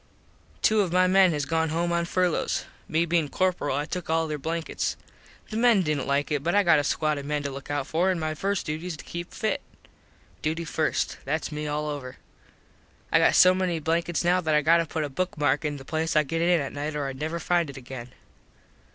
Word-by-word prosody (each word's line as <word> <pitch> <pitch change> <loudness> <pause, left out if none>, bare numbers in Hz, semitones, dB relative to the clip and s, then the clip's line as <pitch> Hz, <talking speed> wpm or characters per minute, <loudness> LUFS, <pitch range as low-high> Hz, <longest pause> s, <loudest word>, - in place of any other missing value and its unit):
Two 215 -1 +4
of 185 -4 -1
my 185 +1 +4
men 185 0 +5
has 145 -3 -1
gone 160 0 0
home 170 +2 0
on 170 0 +1
furlos. 180 -1 0 0.2
Me 160 +2 +1
bein 165 -3 +1
corperal 180 -7 0
I 145 - -1
took 180 +1 -5
all 165 0 +1
there 150 -1 -3
blankets. 165 +3 -2 0.5
The 215 - -2
men 230 -4 +4
didnt 150 -4 -1
like 140 +2 0
it 145 -2 +1
but 170 +5 0
I 205 - +5
got 165 -4 +5
a - - 0
squad 150 0 0
of 140 - -7
men 150 -1 -1
to 140 - -3
look 135 +1 -9
out 145 -2 -1
for 170 +6 +1
an 185 - +1
my 155 -1 -2
first 195 +5 -2
duty 155 +3 -4
is 170 -3 -4
to - - -10
keep 175 +1 -6
fit. 220 -3 -1 0.8
Duty 160 +2 -2
first. 160 -1 -1
Thats 155 +4 -2
me 150 0 -4
all 150 +1 -2
over. 135 -4 -6 0.9
I - - +5
got - - +4
so 185 0 +7
many 185 -2 0
blankets 165 +2 0
now 180 +1 +3
that 155 -3 +1
I 150 - +3
got 165 +3 +5
to 165 -1 0
put 160 0 -2
a - - -1
book 180 +5 -3
mark 145 0 +1
in 150 -1 -2
the 135 - -11
place 160 +3 -1
I 155 - +5
get 165 +3 -2
in 175 0 +4
at 140 -2 -4
night 150 +1 -4
or 145 -2 -2
Id 135 -1 -6
never 160 +3 -2
find 170 -3 +1
it 140 - -9
again. 125 -1 -8
160 Hz, 240 wpm, -26 LUFS, 150-175 Hz, 0.9 s, so